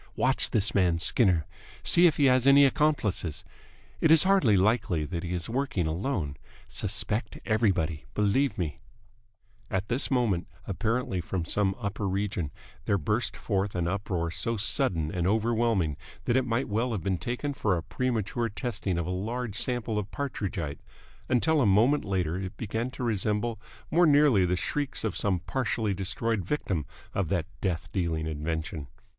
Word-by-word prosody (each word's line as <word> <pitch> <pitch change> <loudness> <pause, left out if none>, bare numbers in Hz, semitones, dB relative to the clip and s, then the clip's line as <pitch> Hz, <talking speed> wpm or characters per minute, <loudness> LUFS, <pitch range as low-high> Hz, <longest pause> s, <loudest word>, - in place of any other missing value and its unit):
Watch - - +2
this 110 +2 +1
man 90 -4 +3
Skinner. 90 -2 +3 0.4
See 175 +1 +6
if 160 - +1
he 145 - +4
has 130 0 +4
any 140 +1 +8
accomplices. 135 - +1 0.6
It 160 - +3
is 160 -1 +8
hardly 185 - +4
likely 95 -6 +1
that 85 +2 -4
he 85 - -5
is 90 -2 -2
working 130 - -1
alone. 80 - -2 0.3
Suspect 105 +3 -2
everybody. 95 -8 +1
Believe 105 +7 +1
me.. 80 -6 -3 0.5
." - - -36
At 95 +2 -4
this 120 +4 +2
moment, 115 -9 +1 0.2
apparently 110 -1 -1
from 85 0 -3
some 95 +1 +1
upper 100 -2 -2
region, 95 -5 -2 0.4
there 100 - +2
burst 105 +8 -1
forth 100 -1 -1
an 85 -1 0
uproar 90 -3 -2
so 115 +6 0
sudden 95 - +1
and 90 -1 -1
overwhelming 110 -6 +1 0.3
that 120 - +1
it 130 -1 +2
might 115 +3 0
well 115 +4 0
have 105 - -3
been 95 -3 0
taken 125 +4 -3
for 105 -8 0
a 80 - -4
premature 115 +3 -1
testing 105 -4 -2
of 85 - -1
a 90 - -3
large 110 +4 -3
sample 115 -2 0
of 100 -1 -5
Partridgite; 100 - -4 0.5
until 150 +5 +3
a 120 - +3
moment 115 +9 +3
later 90 -4 -1
it 95 0 -6
began 115 +3 -3
to 130 - -7
resemble 110 0 0 0.3
more 175 +1 +5
nearly 145 -10 +5
the 90 - +1
shrieks 140 +9 -1
of 110 - -1
some 95 -4 +1
partially 110 0 -1
destroyed 100 +2 -1
victim 95 - -2 0.3
of 100 -5 -1
that 90 -4 0 0.2
death 85 -4 -1
dealing 85 -4 -1
invention. 80 -1 -4
105 Hz, 165 wpm, -28 LUFS, 90-120 Hz, 0.6 s, any